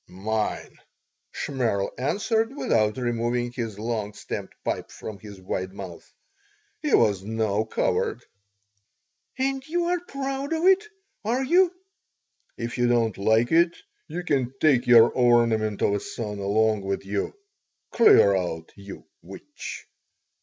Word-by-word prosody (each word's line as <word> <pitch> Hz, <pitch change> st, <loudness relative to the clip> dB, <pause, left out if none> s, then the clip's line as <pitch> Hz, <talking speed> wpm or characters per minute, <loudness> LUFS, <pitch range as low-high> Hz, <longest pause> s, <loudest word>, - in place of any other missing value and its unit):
"Mine," 105 Hz, +4 st, -3 dB, 0.5 s
Shmerl 115 Hz, -8 st, -1 dB
answered, 220 Hz, -, 0 dB
without 105 Hz, -, +1 dB
removing 120 Hz, 0 st, -1 dB
his 115 Hz, -4 st, -5 dB
long 110 Hz, -1 st, -3 dB
stemmed -, -, -6 dB
pipe -, -, -2 dB
from 105 Hz, -2 st, -8 dB
his 100 Hz, -1 st, -11 dB
wide 95 Hz, 0 st, -4 dB
mouth. 95 Hz, -4 st, -9 dB, 0.7 s
He 300 Hz, -, -2 dB
was 105 Hz, -4 st, +3 dB
no 110 Hz, 0 st, -1 dB
coward -, -, -1 dB, 1.1 s
"And 270 Hz, 0 st, -1 dB
you 345 Hz, +2 st, 0 dB
are 355 Hz, +1 st, +1 dB
proud 275 Hz, -3 st, -4 dB
of 320 Hz, +1 st, -1 dB
it, 385 Hz, +2 st, +5 dB, 0.4 s
are 240 Hz, +5 st, 0 dB
you?" 350 Hz, +6 st, +4 dB, 0.9 s
"If 120 Hz, +1 st, -4 dB
you 120 Hz, -, +3 dB
don't 115 Hz, -3 st, +2 dB
like 110 Hz, +4 st, +2 dB
it 170 Hz, +1 st, +3 dB, 0.3 s
you 180 Hz, -, -5 dB
can 135 Hz, -7 st, 0 dB
take 140 Hz, -6 st, +3 dB
your 120 Hz, -1 st, +8 dB
ornament 115 Hz, -4 st, +2 dB
of 100 Hz, -, +3 dB
a 100 Hz, -, 0 dB
son 105 Hz, -2 st, -6 dB
along 105 Hz, +1 st, +1 dB
with 95 Hz, 0 st, -3 dB
you. 100 Hz, +1 st, -3 dB, 0.6 s
Clear 100 Hz, -, +6 dB
out, 85 Hz, -3 st, -3 dB
you 100 Hz, -1 st, -11 dB, 0.2 s
witch!" -, -, -9 dB
115 Hz, 130 wpm, -25 LUFS, -, 1.1 s, your